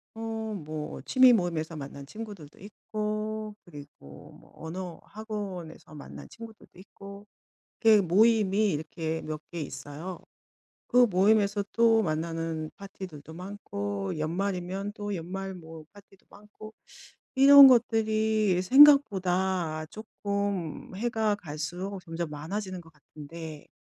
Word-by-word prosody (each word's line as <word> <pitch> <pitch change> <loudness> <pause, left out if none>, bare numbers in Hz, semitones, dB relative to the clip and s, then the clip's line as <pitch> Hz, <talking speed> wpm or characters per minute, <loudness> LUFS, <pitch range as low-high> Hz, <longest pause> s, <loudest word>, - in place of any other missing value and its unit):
어 225 -1 -4
뭐 155 -4 -6
취미 255 -1 +6
모임에서 170 -5 -1
만난 140 -1 -8
친구들도 200 -3 -10
있고 215 +1 -5
그리고 145 - -13
뭐 - - -21
언어 175 +2 -7
학원에서 200 -8 -7
만난 145 - -10
친구들도 225 -4 -13
있고 200 +1 -12 0.6
이렇게 220 -3 +6
모임이 210 +2 +3
이렇게 160 +1 -4
몇 155 -1 -5
개 170 - -5
있어요. 155 +5 -7 0.7
그 245 0 +5
모임에서 200 +2 +3
또 225 -1 +4
만나는 165 -1 -3
파티들도 180 -6 -10
많고 100 - -5
연말이면 185 +4 -3
또 205 -1 -5
연말 190 +3 -5
뭐 160 -2 -11
파티도 200 -1 -20
많고 210 +1 -13 0.6
이런 275 +1 +10
것들이 220 -5 +2
생각보다 190 - +4
쪼끔 200 -5 -4
해가 220 -1 0
갈 155 -7 -9
수록 180 +5 -5
점점 165 -1 -5
많아지는 185 +5 -5
것 165 - -18
같은데 155 +1 -11
190 Hz, 255 characters per minute, -28 LUFS, 160-215 Hz, 0.7 s, 이런